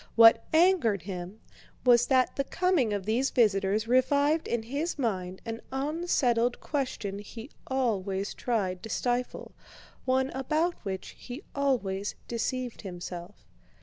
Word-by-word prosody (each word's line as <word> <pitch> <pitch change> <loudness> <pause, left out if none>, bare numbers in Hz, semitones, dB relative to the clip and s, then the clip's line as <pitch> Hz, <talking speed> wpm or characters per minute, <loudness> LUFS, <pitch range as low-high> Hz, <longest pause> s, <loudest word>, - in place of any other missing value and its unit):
What 225 0 +8
angered 315 - +4
him 185 +2 -7 0.4
was 240 -1 +6
that 260 -2 +3
the 275 - 0
coming 345 - +1
of 200 -2 -2
these 240 +6 +1
visitors 210 -1 +2
revived 285 +5 +3
in 235 -2 -1
his 285 +9 -3
mind 190 -8 -2
an 225 0 -5
unsettled 265 -5 +1
question 250 -9 -3
he 225 +5 -9 0.2
always 200 -7 -1
tried 190 -7 -1
to 225 - -8
stifle, 245 +2 -2 0.5
one 260 +1 +1
about 310 +6 0
which 190 -3 -4
he 250 +4 -8
always 210 -9 0
deceived 245 +1 -3
himself. 180 0 -8
235 Hz, 125 wpm, -29 LUFS, 200-270 Hz, 0.5 s, What